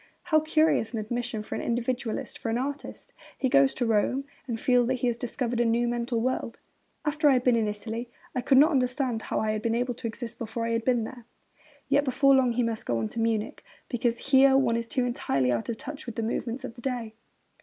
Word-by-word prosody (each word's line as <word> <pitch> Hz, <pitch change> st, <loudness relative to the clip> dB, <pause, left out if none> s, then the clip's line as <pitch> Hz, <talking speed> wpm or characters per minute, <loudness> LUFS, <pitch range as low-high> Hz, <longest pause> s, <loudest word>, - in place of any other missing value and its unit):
How 330 Hz, -4 st, +3 dB
curious 310 Hz, -6 st, +2 dB
an 225 Hz, -, -1 dB
admission 240 Hz, 0 st, -3 dB
for -, -, -7 dB
an -, -, -2 dB
individualist, 240 Hz, -1 st, -2 dB
for -, -, -3 dB
an 225 Hz, -, 0 dB
artist! 280 Hz, +3 st, -5 dB, 0.2 s
He 260 Hz, -, 0 dB
goes 275 Hz, 0 st, +4 dB
to 245 Hz, -, 0 dB
Rome, 230 Hz, +5 st, +1 dB, 0.2 s
and 230 Hz, -3 st, -3 dB
feels 245 Hz, -1 st, +3 dB
that 260 Hz, -, +1 dB
he 250 Hz, -, -2 dB
has 240 Hz, -1 st, +1 dB
discovered 240 Hz, 0 st, -3 dB
a -, -, +4 dB
new 235 Hz, +1 st, +2 dB
mental 235 Hz, 0 st, -1 dB
world. 250 Hz, -1 st, -2 dB, 0.5 s
'After 300 Hz, 0 st, +3 dB
I -, -, +6 dB
had 250 Hz, -1 st, +2 dB
been 250 Hz, -2 st, +4 dB
in 225 Hz, -2 st, +1 dB
Italy 225 Hz, +3 st, -5 dB, 0.2 s
I 250 Hz, -, -1 dB
could 265 Hz, -, +4 dB
not 300 Hz, +5 st, +7 dB
understand 250 Hz, -3 st, 0 dB
how -, -, -2 dB
I 215 Hz, 0 st, 0 dB
had 215 Hz, 0 st, -2 dB
been 230 Hz, 0 st, 0 dB
able 245 Hz, +1 st, 0 dB
to 240 Hz, 0 st, -5 dB
exist 235 Hz, +1 st, -6 dB
before 230 Hz, 0 st, -3 dB
I 230 Hz, -, -1 dB
had 230 Hz, 0 st, 0 dB
been 245 Hz, -3 st, +2 dB
there.' 240 Hz, +1 st, -8 dB, 0.6 s
Yet 280 Hz, +1 st, +3 dB
before 275 Hz, +1 st, +4 dB
long 255 Hz, -3 st, +4 dB
he 245 Hz, +1 st, +1 dB
must 230 Hz, -1 st, -3 dB
go 120 Hz, -, +1 dB
on 110 Hz, -1 st, -2 dB
to -, -, -5 dB
Munich, 225 Hz, -2 st, -1 dB, 0.3 s
because 240 Hz, +1 st, -1 dB
'here 270 Hz, 0 st, +7 dB
one 250 Hz, -4 st, +2 dB
is 230 Hz, 0 st, -2 dB
too 255 Hz, +1 st, 0 dB
entirely 135 Hz, -, 0 dB
out 120 Hz, -2 st, -2 dB
of 230 Hz, -, -2 dB
touch 295 Hz, +3 st, -7 dB
with 235 Hz, -, -6 dB
the 230 Hz, -, -2 dB
movements 235 Hz, +3 st, -3 dB
of 260 Hz, -, -6 dB
the 240 Hz, -, -13 dB
day.' 240 Hz, -4 st, -3 dB
240 Hz, 240 wpm, -27 LUFS, 230-260 Hz, 0.6 s, not